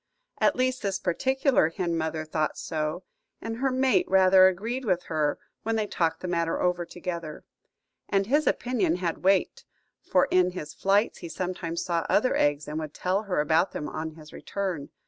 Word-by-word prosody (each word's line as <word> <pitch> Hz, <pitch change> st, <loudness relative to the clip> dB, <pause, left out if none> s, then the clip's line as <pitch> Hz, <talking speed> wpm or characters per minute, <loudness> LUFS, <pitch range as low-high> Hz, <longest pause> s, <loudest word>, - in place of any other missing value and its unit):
At -, -, +3 dB
least 255 Hz, 0 st, 0 dB
this 195 Hz, -2 st, -1 dB
particular 265 Hz, -, +2 dB
hen 170 Hz, 0 st, -2 dB
mother 160 Hz, -1 st, -2 dB
thought 155 Hz, 0 st, -1 dB
so, 155 Hz, +3 st, -3 dB, 0.4 s
and 225 Hz, 0 st, -5 dB
her 270 Hz, +2 st, +1 dB
mate 260 Hz, 0 st, +2 dB
rather 190 Hz, 0 st, +7 dB
agreed 225 Hz, +8 st, -2 dB
with 180 Hz, -6 st, 0 dB
her 155 Hz, -2 st, 0 dB, 0.2 s
when 225 Hz, +1 st, -1 dB
they 215 Hz, -1 st, 0 dB
talked 165 Hz, -5 st, -1 dB
the 185 Hz, -, -4 dB
matter 170 Hz, -1 st, 0 dB
over 175 Hz, -1 st, 0 dB
together. 170 Hz, -4 st, -6 dB, 0.7 s
And 195 Hz, -1 st, +2 dB
his 295 Hz, +7 st, +2 dB
opinion 210 Hz, -10 st, +1 dB
had 175 Hz, -2 st, -2 dB
weight, 190 Hz, 0 st, +2 dB, 0.4 s
for 180 Hz, -, +2 dB
in 180 Hz, 0 st, +3 dB
his 150 Hz, -5 st, -6 dB
flights 200 Hz, +3 st, +1 dB
he 170 Hz, -, -7 dB
sometimes 170 Hz, -2 st, -3 dB
saw 170 Hz, -2 st, -1 dB
other 255 Hz, +5 st, +3 dB
eggs, 145 Hz, 0 st, +1 dB
and 150 Hz, +1 st, -3 dB
would 155 Hz, -1 st, -6 dB
tell 185 Hz, +3 st, 0 dB
her 195 Hz, -7 st, -2 dB
about 160 Hz, +5 st, +2 dB
them 150 Hz, -, -4 dB
on 155 Hz, 0 st, -5 dB
his 155 Hz, -1 st, -14 dB
return. 185 Hz, -8 st, -4 dB
180 Hz, 180 wpm, -27 LUFS, 160-200 Hz, 0.7 s, rather